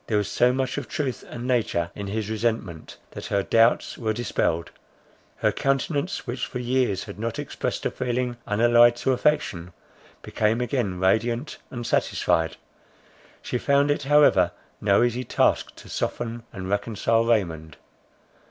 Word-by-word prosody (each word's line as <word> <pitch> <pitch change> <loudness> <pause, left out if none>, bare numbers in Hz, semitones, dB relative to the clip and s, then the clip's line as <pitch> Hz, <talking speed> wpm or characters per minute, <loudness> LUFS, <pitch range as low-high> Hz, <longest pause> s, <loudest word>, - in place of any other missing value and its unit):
There 110 - +1
was 105 -2 -1
so 125 +1 +4
much 130 +2 -1
of - - -8
truth 135 -4 -3
and 120 0 -6
nature 110 -9 0
in 100 - -6
his 105 +1 -3
resentment, 110 -6 -3
that - - -7
her 100 -1 0
doubts 115 +3 +2
were 110 -2 0
dispelled. 85 -7 -1 0.6
Her - - +1
countenance, 140 +5 -1
which 125 0 -4
for - - -6
years 125 -5 0
had 100 -1 -10
not 115 0 -3
expressed - - -4
a - - +1
feeling 125 0 -2
unallied 120 +2 +5
to 125 +2 0
affection, 115 - 0 0.5
became 110 +2 0
again 120 -7 -1
radiant 115 +8 0
and 120 -2 -6
satisfied. 80 -7 +1 0.9
She 125 - -2
found 140 +2 +3
it 145 - 0
however 140 -11 +4 0.3
no 100 +2 +4
easy 120 +1 0
task - - +1
to - - -13
soften 115 0 -3
and 95 -3 -6
reconcile 115 +3 +1
Raymond. 85 -9 -1
115 Hz, 150 wpm, -25 LUFS, 100-125 Hz, 0.9 s, unallied